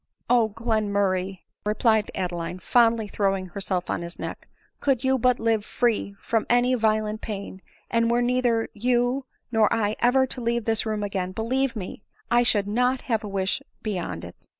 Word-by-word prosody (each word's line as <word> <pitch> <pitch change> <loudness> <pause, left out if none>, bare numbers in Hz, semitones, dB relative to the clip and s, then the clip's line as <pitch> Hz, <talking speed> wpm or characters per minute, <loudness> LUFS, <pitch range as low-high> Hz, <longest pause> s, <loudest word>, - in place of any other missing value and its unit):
" - - -45
O 220 -1 +2
Glenmurray 200 -4 0
!" - - -52
replied 215 0 +2
Adeline, 175 -1 -3
fondly 230 +2 +3
throwing 195 -2 0
herself 185 0 -3
on - - -2
his 170 +1 -7
neck, - - -6 0.2
" - - -39
could 270 -3 +1
you 265 0 +2
but 250 +1 +3
live 225 -2 +1
free 215 -3 0
from 225 -2 -1
any 245 +1 +4
violent 215 -2 +1
pain, 200 -3 -6 0.3
and 230 -1 +2
were 240 +1 +2
neither 245 -2 +1
you 245 +4 +1 0.2
nor 220 -2 +3
I 215 -2 +1
ever 260 +2 +4
to 255 -1 -4
leave 235 -1 0
this 225 0 +1
room 215 -1 -1
again, 190 -2 -2
believe 250 +4 0
me, 200 -1 -6 0.3
I 240 0 +5
should 210 -4 +2
not 250 +4 +1
have 225 -3 -1
a - - -4
wish 195 -1 -1 0.2
beyond 175 - -3
it. 85 - -13
220 Hz, 180 wpm, -25 LUFS, 200-240 Hz, 0.3 s, I